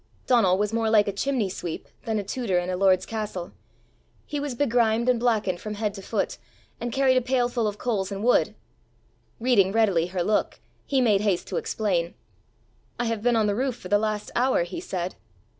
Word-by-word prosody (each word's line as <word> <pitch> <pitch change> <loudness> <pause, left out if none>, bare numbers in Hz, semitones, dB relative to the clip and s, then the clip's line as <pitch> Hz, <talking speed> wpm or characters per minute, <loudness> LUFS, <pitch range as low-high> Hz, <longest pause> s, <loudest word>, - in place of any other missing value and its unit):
Donal 205 -7 +4
was 210 +2 -1
more 225 -1 +1
like 210 -2 +4
a - - +1
chimney 245 +1 0
sweep 175 -3 -6 0.2
than 220 -2 -1
a 205 - -1
tutor 200 -2 -1
in 175 +1 -1
a - - -1
lord's 185 0 +3
castle. 210 -5 -5 0.7
He 295 - -4
was 285 -3 -3
begrimed 235 -3 +2
and 250 -2 +3
blackened 220 -7 +1
from 215 -1 -5
head 210 -1 -2
to 195 - -8
foot, - - -2 0.4
and 240 0 -3
carried 265 0 +3
a - - +3
pailful 245 -2 0
of 205 0 -3
coals 210 -5 -1
and 200 +1 -4
wood. 245 - +3 0.8
Reading 225 -6 +3
readily 195 -6 +2
her 180 -1 -2
look, 210 +3 0 0.3
he 270 -2 +2
made 210 -5 +3
haste 200 -4 0
to - - -2
explain. 210 - -1 0.8
"I 240 - 0
have 225 -2 -1
been 240 +1 +2
on 220 -1 +3
the 205 - +1
roof 255 +3 -1
for 180 - -10
the 205 - +4
last 215 -1 -2
hour," 250 -6 +2
he 175 - -6
said. 185 - -4
215 Hz, 200 wpm, -25 LUFS, 195-245 Hz, 0.8 s, Donal